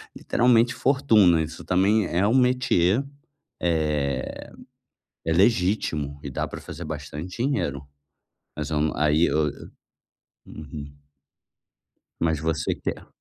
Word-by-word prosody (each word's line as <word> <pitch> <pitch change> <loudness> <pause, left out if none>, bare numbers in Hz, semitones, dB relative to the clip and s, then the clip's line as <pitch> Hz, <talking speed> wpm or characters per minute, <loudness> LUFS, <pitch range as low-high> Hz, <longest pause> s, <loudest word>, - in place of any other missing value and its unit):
literalmente 120 0 +3
fortuna, 110 - +4
isso 80 +1 -8
também 95 +2 +2
é 95 +4 +1
um 115 - +2
metiê, 125 -5 +3 0.6
eh, 75 -5 -1 0.8
é 80 - +1
legítimo 90 - +1
e 70 - -5
dá - - -3
para - - -8
fazer - - -8
bastante 75 +4 -7
dinheiro, 70 - -1 0.7
mas 75 -2 -4
vamos 75 0 0
aí 75 +2 +3
eu, 75 -2 +1 1.0
Uhum. 75 -1 -9 1.2
Mas 80 -3 0
você 80 -1 -1
quer? - - -5
80 Hz, 110 wpm, -24 LUFS, 75-105 Hz, 1.2 s, fortuna